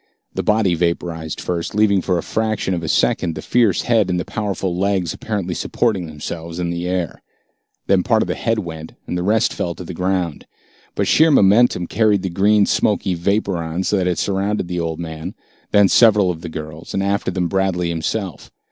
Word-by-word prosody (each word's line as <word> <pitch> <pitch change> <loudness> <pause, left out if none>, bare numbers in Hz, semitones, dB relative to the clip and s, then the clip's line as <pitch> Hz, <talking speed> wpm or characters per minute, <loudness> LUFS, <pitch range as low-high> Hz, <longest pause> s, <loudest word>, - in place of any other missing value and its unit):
The - - -2
body 105 -4 +2
vaporized 85 -2 -2
first, 85 +2 -3
leaving 100 -2 +3
for 90 0 0
a 85 - -2
fraction 110 -3 -1
of 85 - -2
a 80 - -5
second 80 +1 +1
the - - -5
fierce 115 -7 +2
head 110 -5 +2
and 90 -1 0
the - - -3
powerful 95 -5 -3
legs 95 -2 0
apparently 100 -5 -3
supporting 95 +1 -1
themselves 80 +2 -7
in 85 -1 -2
the 85 +1 -3
air. 90 -2 -2 0.6
Then 95 -2 +3
part 110 +3 +2
of - - -6
the - - -1
head 115 -1 -1
went, 80 -5 -6
and - - -4
the 90 - -1
rest 105 +4 +2
fell 85 -1 -3
to - - -8
the 90 - -7
ground. 90 -2 -2 0.5
But - - 0
sheer 160 +1 +5
momentum 105 - +4
carried 105 -1 +2
the 95 - -2
green 100 +3 +3
smoky 100 -3 +1
vapor 100 +2 0
on, 85 +2 -3
so 105 - +1
that 90 -1 0
it 90 - 0
surrounded 100 +2 0
first 90 - -11
the 90 -1 -2
old 80 -1 -3
man, 80 -2 -6 0.3
then 100 -1 +5
several 105 -4 +5
of 80 -2 -8
the 85 - -6
girls, 80 0 -7
and 95 - 0
after 100 0 0
them, 90 -1 -1
Bradley 90 -1 0
himself. 85 +2 -3
90 Hz, 205 wpm, -20 LUFS, 85-100 Hz, 0.6 s, sheer